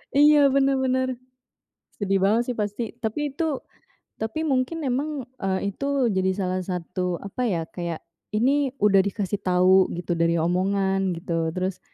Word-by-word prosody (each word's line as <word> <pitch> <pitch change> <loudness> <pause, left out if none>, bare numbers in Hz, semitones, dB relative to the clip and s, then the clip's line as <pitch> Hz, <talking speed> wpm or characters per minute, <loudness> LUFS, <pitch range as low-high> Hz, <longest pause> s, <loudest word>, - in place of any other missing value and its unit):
Iya, 290 0 +7
benar 275 0 +2
benar. 260 0 +1 0.9
Sedih 195 -2 0
banget, 230 +5 +2
sih, - - -12
pasti. 210 +2 -3
Tapi 275 +6 -2
itu 305 -2 -1 0.6
tapi 225 +9 -2
mungkin 285 +3 0
memang, 275 +1 -1 0.2
eee, 195 +1 -1
itu 275 +1 0
jadi 190 -1 +1
salah 185 -2 -1
satu, 180 0 -3
apa, 240 +5 -2
ya? 170 -5 0
Kayak, 170 -2 -5 0.3
ini 270 +3 +2
udah 205 -5 +4
dikasih 200 +1 -1
tahu 185 +1 +4
gitu 175 0 -5
dari 170 0 +2
omongan, 190 +2 +1
gitu. 165 -1 -2
Terus 185 0 -2
200 Hz, 145 wpm, -24 LUFS, 185-265 Hz, 0.9 s, Iya